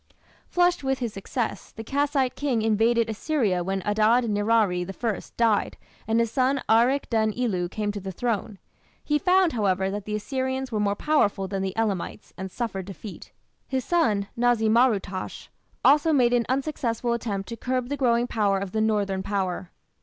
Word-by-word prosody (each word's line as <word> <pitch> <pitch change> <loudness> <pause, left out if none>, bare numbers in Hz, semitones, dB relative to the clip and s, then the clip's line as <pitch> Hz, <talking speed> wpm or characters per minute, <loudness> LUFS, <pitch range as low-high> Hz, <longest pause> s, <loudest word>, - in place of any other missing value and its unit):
Flushed 355 -3 +2
with 270 0 0
his 235 -4 -3
success, 225 +4 -4
the 225 - -8
Kassite 275 +1 0
king 255 -6 -1
invaded 225 +2 +2
Assyria 220 - 0
when 190 +1 -2
Adad 215 +4 +3
nirari 205 -3 +2
I 195 +3 -4
died 225 -3 +2 0.3
and 225 +1 +2
his 230 -1 +1
son 265 +2 +2
Arik 245 +5 +3
den 220 -1 +2
ilu 195 -8 -1
came 210 +1 -2
to 205 - -5
the 190 0 -6
throne. 215 0 -2 0.5
He 295 0 +1
found, 370 -1 +3
however, 190 -4 +1
that 205 0 -5
the 210 - -3
Assyrians 260 +3 -3
were 215 - -1
more 205 -1 +1
powerful 205 -9 +1
than 195 0 -3
the 190 +1 -3
Elamites, 210 -5 -2
and 190 0 -6
suffered 195 -3 -4
defeat. 195 +2 -9 0.4
His 260 -1 -2
son, 215 - +1
Na´zi 235 -2 +2
mar 240 +3 +6
ut´tash, 195 -3 -5 0.4
also 300 +3 +5
made 245 -5 +3
an 240 -1 +2
unsuccessful 255 -4 -1
attempt 205 -5 -3
to 230 - -4
curb 255 +1 -2
the 285 - -1
growing 240 -3 +2
power 210 -5 +1
of 195 -1 -4
the 220 - 0
northern 205 -3 0
Power. 190 -2 -2
225 Hz, 175 wpm, -25 LUFS, 200-255 Hz, 0.5 s, mar